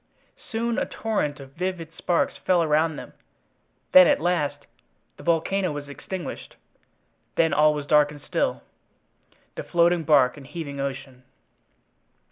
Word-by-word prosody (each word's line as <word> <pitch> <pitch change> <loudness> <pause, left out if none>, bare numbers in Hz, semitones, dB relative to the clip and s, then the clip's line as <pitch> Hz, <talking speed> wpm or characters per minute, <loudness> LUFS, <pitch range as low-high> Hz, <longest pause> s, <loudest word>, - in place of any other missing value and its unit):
Soon 230 0 -3
a - - -2
torrent 155 -10 -2
of 135 -1 -11
vivid 175 -1 -4
sparks 175 -2 0
fell 180 -2 +1
around 155 +1 +2
them—then, 185 +4 0
at - - +3
last, 150 -4 -1 0.5
the - - -12
volcano 170 +2 0
was 145 -1 -6
extinguished—then 165 -1 -6
all 150 +1 +4
was 145 -1 -4
dark 150 0 +4
and 150 0 -10
still—the - - -7
floating 170 0 +2
bark 145 -4 +3
and 135 -2 -12
heaving 145 -5 -6
ocean. 135 -2 -5
155 Hz, 120 wpm, -24 LUFS, 145-175 Hz, 0.5 s, all